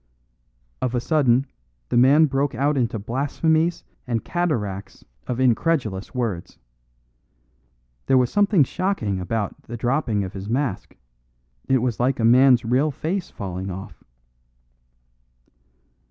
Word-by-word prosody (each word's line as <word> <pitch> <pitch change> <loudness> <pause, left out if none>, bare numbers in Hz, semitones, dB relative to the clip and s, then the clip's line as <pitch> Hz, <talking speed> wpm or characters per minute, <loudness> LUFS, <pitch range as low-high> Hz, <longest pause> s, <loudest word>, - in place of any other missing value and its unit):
Of 125 -1 -1
a - - +2
sudden 130 -2 +2 0.4
the - - -1
man 135 +6 +6
broke 135 -1 -1
out 145 +4 +1
into 120 -3 0
blasphemies 155 - 0 0.2
and 115 -2 -2
cataracts 105 - -3 0.2
of 125 0 -3
incredulous 125 - 0
words. 110 -9 -3 1.5
There 135 - +4
was 125 -1 +2
something 205 -5 +4
shocking 130 - -2
about 100 +3 -3
the 120 - -8
dropping 120 -3 0
of 95 - -6
his 95 +1 -7
mask; 125 -3 -2 0.7
it 130 -2 +3
was 125 -3 -1
like 125 +2 +1
a 115 - +2
man's 125 0 +5
real 130 +6 +2
face 170 +6 -3
falling 95 -1 -6
off. 95 +1 -9
125 Hz, 125 wpm, -23 LUFS, 110-145 Hz, 1.5 s, man